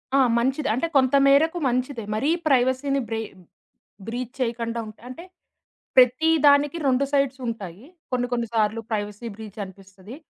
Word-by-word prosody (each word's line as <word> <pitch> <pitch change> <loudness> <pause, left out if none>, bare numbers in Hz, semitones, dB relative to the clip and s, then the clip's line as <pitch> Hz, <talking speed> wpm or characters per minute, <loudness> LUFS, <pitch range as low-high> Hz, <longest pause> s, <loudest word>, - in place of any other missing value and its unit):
ఆ! - - +5 0.2
మంచిది 265 +3 0
అంటే 260 +8 -1
కొంత 260 +1 +3
మేరకు 315 +5 +4
మంచిదే. 250 -1 -2
మరీ 275 +8 0 0.2
ప్రైవసీని 265 +1 +2
బ్రె 225 0 -2 0.9
బ్రీచ్ 245 +2 -5
చేయకుండా 230 -1 -2
ఉంటే. 215 - -12
అంటే 295 +8 -9 0.7
ప్రతి 255 +6 +5 0.2
దానికి 285 +2 +4
2 265 +1 +2
సైడ్స్ 275 -2 +1
ఉంటాయి. 205 -2 -6 0.3
కొన్ని 245 -1 0
కొన్ని 235 -1 0
సార్లు 220 +1 +1
ప్రైవసీ 210 +1 -4
బ్రీచ్ 215 -1 -10
అనిపిస్తది. 195 +4 -13
245 Hz, 140 wpm, -24 LUFS, 225-275 Hz, 0.9 s, ఆ